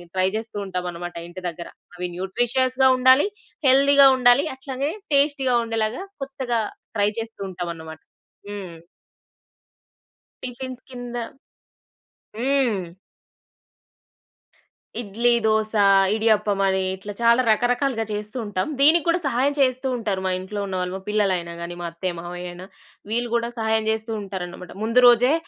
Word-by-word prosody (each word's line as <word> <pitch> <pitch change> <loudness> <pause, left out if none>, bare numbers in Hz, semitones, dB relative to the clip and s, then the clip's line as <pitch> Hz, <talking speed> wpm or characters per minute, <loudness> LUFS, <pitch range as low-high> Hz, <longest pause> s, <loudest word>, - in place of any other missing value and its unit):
Try 185 0 +3
జేస్తూ 220 -1 -5
ఉంటామనమాట 175 -2 -5
ఇంటి 180 +1 -10
దగ్గర. 170 0 -8 0.3
అవి 180 0 -3
న్యూట్రిషియస్‌గా 255 +7 +1
ఉండాలి, 260 +7 +5 0.4
హెల్దీగా 275 +1 +7
ఉండాలి. 250 +3 +5
అట్లాగే 270 +2 -3 0.2
టేస్టీగా 280 -3 +3
ఉండేలాగా 225 - -2 0.2
కొత్తగా 260 -4 -2 0.4
ట్రై 205 0 +3
చేస్తూ 225 -1 -7
ఉంటామనమాట. 165 -3 -6 0.5
హ్మ్. 190 -5 -7 1.7
టిఫిన్స్ 255 0 -6
కింద 245 -1 -7 1.2
హ్మ్. 250 -5 +1 2.2
ఇడ్లీ, 235 +3 +1
దోస, 220 0 +1 0.4
ఇడియప్పమని 205 -3 +2 0.2
ఇట్లా 205 +2 -8
చాలా 235 +2 +5
రకరకాలుగా 245 +1 +1
చేస్తూ 210 +3 -5
ఉంటాం. 205 +3 -2
దీనికి 310 +4 +6
గూడా 335 +1 +3
సహాయం 275 +2 +1
చేస్తూ 255 0 +2
ఉంటారు 205 -5 -2
మా 185 - +1
ఇంట్లో 205 +2 -6
ఉన్న 190 - -4
వాళ్ళు, 180 0 -3
మా - - -11
పిల్లలయినా 185 -5 0
గానీ, 170 +1 -5
మా - - -4
అత్తయ్య, 175 +2 -3
మామయ్యయిన. 175 +1 -7 0.5
వీళ్ళు 240 +2 -1
గూడా 235 0 +1
సహాయం 220 0 +1
జేస్తూ 220 +1 -2
ఉంటారనమాట. 180 -2 -7
ముందు 230 +3 +3
రోజే 245 +4 +5
220 Hz, 120 wpm, -23 LUFS, 190-255 Hz, 2.2 s, హెల్దీగా